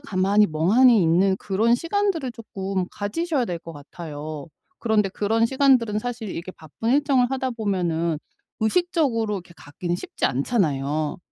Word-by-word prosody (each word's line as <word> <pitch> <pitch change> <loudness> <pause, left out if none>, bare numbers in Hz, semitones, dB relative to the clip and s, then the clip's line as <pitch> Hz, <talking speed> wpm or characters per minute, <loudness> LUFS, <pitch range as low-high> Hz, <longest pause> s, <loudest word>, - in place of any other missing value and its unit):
가만히 205 -4 +2
멍하니 210 +9 +4
있는 180 +4 +3
그런 215 +5 +1
시간들을 335 -4 -1
쪼끔 195 -5 -4
가지셔야 275 +7 -1
될 175 -6 -4
것 165 -1 -10
같아요. 150 0 -8 0.3
그런데 215 -4 +1
그런 220 +3 +1
시간들은 250 -4 +3
사실 235 -2 -5
이렇게 180 +2 -6
바쁜 160 +9 -7
일정을 270 -3 +3
하다 260 -1 -1
보면은 175 -8 -1 0.4
의식적으로 240 - +1
이렇게 180 -3 -7
갖기는 170 +4 -4
쉽지 175 - -5
않잖아요. 145 - 0
205 Hz, 350 characters per minute, -23 LUFS, 170-245 Hz, 0.4 s, 멍하니